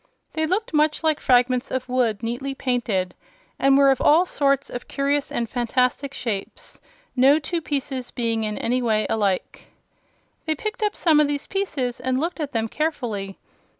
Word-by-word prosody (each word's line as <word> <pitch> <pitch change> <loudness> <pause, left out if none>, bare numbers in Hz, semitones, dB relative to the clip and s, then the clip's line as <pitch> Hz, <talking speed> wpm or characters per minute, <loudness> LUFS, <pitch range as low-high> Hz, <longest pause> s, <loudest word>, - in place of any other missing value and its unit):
They 315 0 0
looked 385 +3 -1
much 305 +1 +2
like 315 -2 +2
fragments 250 0 +3
of 260 -1 -3
wood 245 -4 0
neatly 250 +4 -3
painted, 225 -9 -1 0.5
and 275 0 +5
were 275 -1 +6
of 265 - 0
all 325 +5 +5
sorts 280 -4 +1
of 245 - -7
curious 280 0 -1
and 235 - -1
fantastic 250 +3 0
shapes, 230 - -4 0.3
no 270 +3 +6
two 335 +2 -3
pieces 275 -4 -3
being 230 -2 -1
in 210 -1 -3
any 250 +2 0
way 220 -3 +1
alike. 200 -4 -1 0.8
They 315 - +1
picked 430 +8 -5
up 420 -1 0
some 315 -3 +4
of 300 - +4
these 285 0 -2
pieces 280 -11 -2
and 260 0 0
looked 335 +3 -2
at 295 -2 -3
them 225 -1 0
carefully. 225 -10 -3
265 Hz, 170 wpm, -23 LUFS, 240-300 Hz, 0.8 s, were